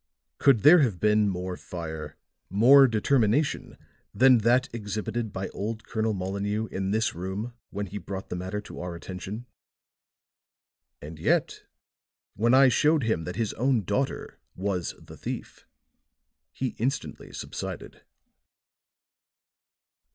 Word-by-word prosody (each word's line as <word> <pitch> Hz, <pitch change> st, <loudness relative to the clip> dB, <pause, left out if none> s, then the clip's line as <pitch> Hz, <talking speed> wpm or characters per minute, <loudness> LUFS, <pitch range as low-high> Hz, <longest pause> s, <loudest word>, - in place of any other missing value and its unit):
Could 135 Hz, -6 st, +5 dB
there 165 Hz, +5 st, +8 dB
have 115 Hz, -, +1 dB
been 105 Hz, 0 st, +3 dB
more 90 Hz, -1 st, -3 dB
fire, 80 Hz, -5 st, -7 dB, 0.3 s
more 130 Hz, +8 st, +7 dB
determination 120 Hz, +4 st, +1 dB, 0.4 s
than 130 Hz, -1 st, +6 dB
that 120 Hz, +4 st, +3 dB
exhibited 110 Hz, +1 st, -3 dB
by 95 Hz, +1 st, -4 dB
old 110 Hz, +2 st, -4 dB
Colonel 110 Hz, -1 st, -1 dB
Molineux 100 Hz, +3 st, -2 dB
in 95 Hz, 0 st, -2 dB
this 110 Hz, +3 st, +1 dB
room 95 Hz, +7 st, -5 dB, 0.2 s
when 100 Hz, +1 st, -4 dB
he 100 Hz, +2 st, -6 dB
brought 95 Hz, +1 st, -7 dB
the -, -, -3 dB
matter 95 Hz, +3 st, -4 dB
to -, -, -10 dB
our 90 Hz, 0 st, -5 dB
attention? 95 Hz, +6 st, -7 dB, 1.6 s
And 75 Hz, +1 st, -9 dB
yet, -, -, 0 dB, 0.7 s
when 115 Hz, +4 st, +3 dB
I 135 Hz, 0 st, +7 dB
showed 150 Hz, +3 st, +3 dB
him 110 Hz, -8 st, 0 dB
that 90 Hz, -, -5 dB
his 110 Hz, -1 st, -1 dB
own 125 Hz, -2 st, +1 dB
daughter 105 Hz, +9 st, -2 dB, 0.2 s
was 95 Hz, -2 st, -2 dB
the -, -, -13 dB
thief, -, -, -7 dB, 0.8 s
he 130 Hz, -, -2 dB
instantly 130 Hz, +5 st, -3 dB
subsided." -, -, -7 dB
105 Hz, 125 wpm, -27 LUFS, 95-120 Hz, 1.6 s, there